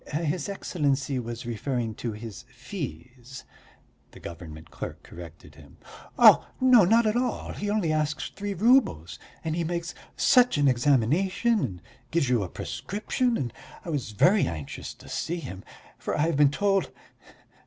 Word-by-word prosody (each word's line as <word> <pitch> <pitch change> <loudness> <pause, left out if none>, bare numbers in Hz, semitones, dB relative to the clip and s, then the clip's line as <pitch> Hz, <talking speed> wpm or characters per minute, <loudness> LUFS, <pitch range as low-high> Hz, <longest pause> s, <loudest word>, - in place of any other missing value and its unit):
"His 160 +2 -1
Excellency 140 -8 -1
was 120 0 -6
referring 120 0 -2
to 115 +1 -4
his 110 +1 -8
fees," 125 - -8 0.7
the - - -15
government 80 -2 -10
clerk 70 - -7
corrected 85 -3 -12
him. 70 -1 -17 0.4
"Oh, - - +7
not 235 -3 +5
at 215 +1 +1
all, 250 +1 -1
he 205 - -4
only 200 -7 +1
asks 155 0 -1
three 205 0 -4
roubles, 210 - +2 0.2
and 160 -1 -2
he 170 - -1
makes 170 +1 -3 0.2
such 250 - +4
an 145 -1 +3
examination, 150 - +2
and 90 -8 -4 0.3
gives 160 -6 +1
you 120 -3 +2
a 95 - -4
prescription... 230 - -2
and 120 -4 -3 0.3
I - - -5
was 140 -7 -2
very 180 - +3
anxious 80 -4 -6
to - - -16
see 175 - -3
him, 110 - -8 0.4
for - - -3
I - - +1
have 165 +1 +1
been 145 0 +5
told.... 195 +5 +1
145 Hz, 155 wpm, -26 LUFS, -, 0.7 s, Oh